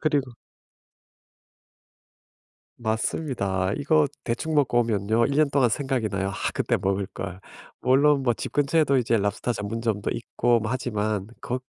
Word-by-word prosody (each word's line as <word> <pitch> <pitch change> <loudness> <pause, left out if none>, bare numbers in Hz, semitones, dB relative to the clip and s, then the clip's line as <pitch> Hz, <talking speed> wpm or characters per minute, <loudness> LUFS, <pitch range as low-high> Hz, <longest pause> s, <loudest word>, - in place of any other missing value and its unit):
그리고 145 -4 +1 2.5
맞습니다. 110 -4 -1
이거 150 +1 +3 0.2
대충 125 +7 -2
먹고 130 -5 +3
오면요. 110 +1 +1
1 140 +2 -1
년 155 -2 +4
동안 135 -3 +4
생각이 130 -2 -1
나요. 95 0 -1
'아 - - -5 0.2
그때 - - +1
먹을 95 0 0
걸.' 95 -1 -6 0.4
물론 140 +2 +4
뭐 120 - +3
집 - - -5
근처에도 145 -1 +2
이제 120 -2 +2
랍스터 105 +4 -1
전문점도 105 0 -2
있고 120 0 +1
뭐 110 +1 -3
하지만 105 -5 -2
거 125 +1 -2
120 Hz, 275 characters per minute, -25 LUFS, 105-140 Hz, 2.5 s, 년